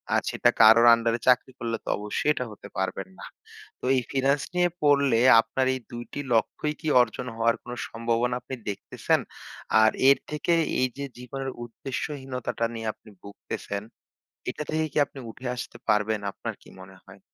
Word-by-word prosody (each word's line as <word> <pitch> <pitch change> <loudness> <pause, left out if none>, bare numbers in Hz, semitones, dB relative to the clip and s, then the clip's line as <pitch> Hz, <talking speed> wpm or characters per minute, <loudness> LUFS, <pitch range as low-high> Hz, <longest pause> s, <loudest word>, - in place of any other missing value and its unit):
আজ - - +2
সেটা - - +3
কারোর 115 +2 +8
আন্ডারে 115 0 +1
চাকরি 125 +1 +4
করলে 115 -1 -2
তো - - -27
অবশ্যই 105 +8 -2
এটা 125 - -3
হতে 105 - -11
পারবেন 95 0 -2
না। - - -8 0.5
তো - - -7
এই 130 - +2
ফিন্যান্স 140 +1 +2
নিয়ে 175 0 +3
পড়লে 140 -5 +4 0.2
আপনার 120 +4 -1
এই 130 - -3
২ 120 0 -5
টি 145 - -3
লক্ষ্যই 150 +6 0
কি 155 - -5
অর্জন 125 +1 -2
হওয়ার 115 0 +2
কোন 120 - -8 0.2
সম্ভাবনা 115 +1 0
আপনি 130 - -6
দেখতেছেন? 100 - -1 0.6
আর 110 - +6 0.2
এর 140 - +6
থেকে 150 +3 0 0.3
এই 130 - +3
যে 140 - -3
জীবনের 135 +2 -5 0.2
উদ্দেশ্যহীনতাটা 130 0 -4
নিয়ে 115 -1 -5
আপনি - - -19
ভুগতেছেন 100 0 -6 0.7
এটা - - -4
থেকে 160 0 +1
কি - - -5
আপনি 140 - -12
উঠে 125 +3 -8
আসতে 125 - -7
পারবেন 105 0 +2
আপনার - - -6
কি - - -16
মনে - - -13
হয়? - - -15
120 Hz, 175 wpm, -26 LUFS, 115-135 Hz, 0.7 s, কারোর